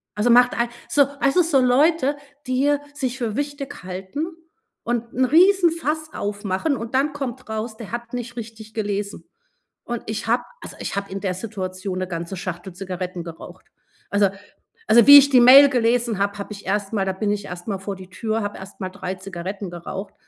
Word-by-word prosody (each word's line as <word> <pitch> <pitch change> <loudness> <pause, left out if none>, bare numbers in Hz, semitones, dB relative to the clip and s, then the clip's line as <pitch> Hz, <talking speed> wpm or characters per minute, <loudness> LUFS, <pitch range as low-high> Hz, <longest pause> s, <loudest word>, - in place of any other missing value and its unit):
Also 210 +4 +1
macht 245 +1 +6
ei 235 - +1 0.2
so 285 - +5 0.2
also, 275 +5 +3
so 315 -5 +3
Leute, 285 +3 +3 0.3
die 270 +3 +2 0.2
sich 265 -3 -3
für 230 -5 -3
wichtig 285 -4 -5
halten 190 - -4 0.6
und 235 0 -2
'n 260 +1 +2
Riesenfass 330 -1 +3
aufmachen 205 +7 -2
und 230 +3 -5
dann 280 +2 +2
kommt 270 -4 -5
raus, 220 +1 -4
der 225 -3 -9
hat 235 0 -6
nicht 240 -1 -5
richtig 220 -2 -9
gelesen. 205 -1 -3 0.6
Und 240 -1 -5
ich 220 +1 -4
habe 240 +2 +2 0.2
also, - - -9
ich - - -4
habe 200 -1 -4
in 195 - -4
der 190 -3 -1
Situation 185 -2 -5
'ne 185 - -2
ganze 170 +1 -5
Schachtel 180 0 -6
Zigaretten 185 -1 -5
geraucht. 165 -1 -11 0.5
Also 200 -1 +3 0.6
also 225 +1 +6
wie 285 0 +13
ich 280 0 +3
die 260 -3 +6
Mail 270 +4 +9
gelesen 235 -3 +1
habe, 200 +1 0
habe 200 +1 -6
ich 200 - -11
erst 200 +1 -1
mal 195 -3 +1
da 190 - -1
bin 205 +2 -1
ich 205 -1 -3
erst 180 +2 -8
mal 195 -3 -2
vor 195 +1 -5
die 185 -1 -12
Tür, 220 +3 -2
habe 205 0 -4
erst 190 +1 -12
mal 185 - -3
3 190 -1 -5
Zigaretten 190 +1 -6
geraucht 175 +3 -7
220 Hz, 190 wpm, -22 LUFS, 195-255 Hz, 0.6 s, wie